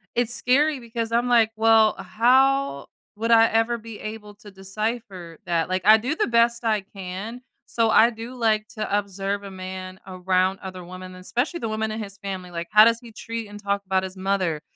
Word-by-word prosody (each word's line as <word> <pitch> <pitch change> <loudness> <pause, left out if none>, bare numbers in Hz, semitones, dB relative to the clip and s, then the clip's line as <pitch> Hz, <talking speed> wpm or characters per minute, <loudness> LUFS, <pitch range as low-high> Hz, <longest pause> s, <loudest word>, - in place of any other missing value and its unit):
it's 240 0 +1
scary 280 +4 +2
because 230 -1 -5
I'm 235 +1 +1
like, 230 -2 +4
"Well, 220 0 +4
how 255 - +2 0.3
would 225 +2 -3
I 225 0 +7
ever 225 +1 +1
be 225 -1 -10
able 215 -1 -8
to 210 0 -14
decipher 195 -3 -5
that?" 170 -1 0
like, 185 0 -1
I 215 +1 +8
do 255 +7 -2
the - - +1
best 235 0 +2
I 215 -2 +2
can. 195 +5 -8 0.3
So 230 -1 +1
I 225 +1 +6
do 230 +1 -8
like 220 -3 0
to 215 -1 -2
observe 200 0 -3
a 200 - -8
man 185 0 -8
around 185 0 0
other 185 -1 -7
women, 185 +1 -10
especially 245 - -3
the 225 - -3
women 215 0 -2
in 220 +1 -4
his 200 -2 -8
family, 190 -2 -6
like, 170 -1 -5
how 210 0 +8
does 230 0 +3
he 235 -2 -13
treat 230 0 -6
and 205 0 -10
talk 200 0 -1
about 190 0 +1
his 190 0 -7
mother, 185 -5 -1
215 Hz, 200 wpm, -24 LUFS, 190-230 Hz, 0.3 s, I